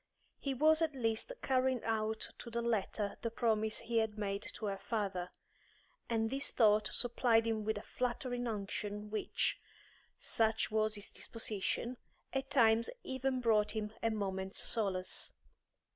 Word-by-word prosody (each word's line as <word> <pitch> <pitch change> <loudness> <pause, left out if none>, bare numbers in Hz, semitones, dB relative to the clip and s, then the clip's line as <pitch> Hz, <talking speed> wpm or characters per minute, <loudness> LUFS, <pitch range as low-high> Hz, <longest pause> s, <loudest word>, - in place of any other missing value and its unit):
He 275 -2 -2
was 310 +4 +5
at 315 -3 +1
least 225 - 0
carrying 260 -2 +2
out 220 -1 0
to 235 - -7
the 235 0 -2
letter 210 -2 0
the 230 - -1
promise 220 -2 +1
he 230 0 +1
had 220 -1 -1
made 200 -1 -1
to 220 - -5
her 195 -1 -2
father, 195 -4 -2 0.8
and 225 -1 +1
this 275 +1 0
thought 215 -2 +4
supplied 235 -2 +3
him 220 -1 0
with 220 0 0
a 205 - -6
flattering 245 0 -2
unction 210 0 -3
which, 215 - 0 0.6
such 220 -1 +1
was 215 0 +2
his 205 -1 -3
disposition, 230 +2 -2 0.4
at 270 0 -1
times 230 -3 +4
even 260 0 -1
brought 215 -3 +3
him 215 0 -2
a 230 - +2
moment's 190 -3 -2
solace. 190 -5 -1
225 Hz, 145 wpm, -35 LUFS, 210-240 Hz, 0.8 s, was